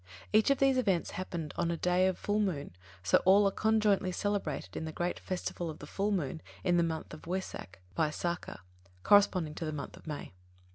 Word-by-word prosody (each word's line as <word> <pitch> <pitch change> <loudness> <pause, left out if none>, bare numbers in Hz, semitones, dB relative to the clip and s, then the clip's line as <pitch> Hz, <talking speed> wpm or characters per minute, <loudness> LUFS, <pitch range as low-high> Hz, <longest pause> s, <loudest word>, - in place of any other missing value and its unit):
Each 215 +3 +5
of 275 - +4
these 270 -1 +3
events 195 -8 +1
happened 170 -5 -5
on 170 - +1
a 170 - -1
day 180 +2 +3
of 185 - 0
full 205 +1 0
moon, 155 - -2 0.3
so 95 - +4
all 200 +2 +6
are - - +1
conjointly 210 -3 +2
celebrated 195 -7 -2
in 160 - -3
the 160 - -4
great 175 +3 -2
festival 175 -2 -4
of 155 - -7
the - - -9
full 200 +7 -1
moon 160 -5 -1 0.2
of 175 -2 +3
the 175 - +4
month 160 -2 -2 0.2
Wesak 180 - -4 0.2
(Vaisākha), 160 - -2 0.4
corresponding 185 -6 +4
to 165 - -6
the 155 - -2
month 150 -2 -6
of - - -16
May. 150 -10 -6
180 Hz, 195 wpm, -31 LUFS, 160-200 Hz, 0.4 s, all